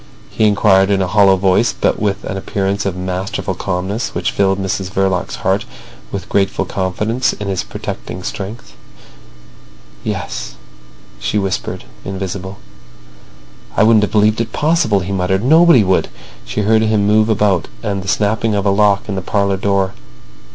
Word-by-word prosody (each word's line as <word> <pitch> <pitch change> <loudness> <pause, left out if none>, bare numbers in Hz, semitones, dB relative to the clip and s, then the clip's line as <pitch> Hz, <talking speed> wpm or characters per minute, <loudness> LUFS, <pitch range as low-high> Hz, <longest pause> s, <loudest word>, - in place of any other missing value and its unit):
he 110 - +1
inquired 95 -2 +4
in 100 -1 +2
a 95 - +1
hollow 100 0 +5
voice, 95 +4 +2
but - - +1
with 105 -1 -1
an - - -4
appearance 100 0 -2
of 95 - -2
masterful 95 +3 -3
calmness 95 +3 -3
which - - -1
filled 95 -1 +1
Mrs 95 -1 -2
Verloc's 95 -2 -1
heart - - +2 0.5
with 100 - -5
grateful 100 -1 0
confidence 105 +7 -1
in 105 - -6
his 95 -2 -1
protecting 90 - -6
strength. 105 +6 -6 1.3
"Yes," 60 - -4 0.6
she - - -1
whispered, 95 -2 -2 0.2
invisible. 95 0 -5 1.2
"I - - +5
wouldn't 110 -1 +5
have 105 - -1
believed 110 +1 +3
it 115 -1 -4
possible," 150 -11 +2
he 90 +2 -5
muttered. 95 +1 0
"Nobody 160 -2 +6
would." 95 -1 +2 0.4
She - - -2
heard 110 +2 +3
him 110 -2 +2
move 110 +1 +3
about 100 -5 +2 0.2
and 100 -3 -2
the 95 - -9
snapping 110 +1 +1
of 100 0 -1
a 100 - +3
lock 100 0 +2
in 105 - -3
the 95 - -2
parlour 100 +1 0
door. 95 -1 0
100 Hz, 160 wpm, -17 LUFS, 95-105 Hz, 1.3 s, Nobody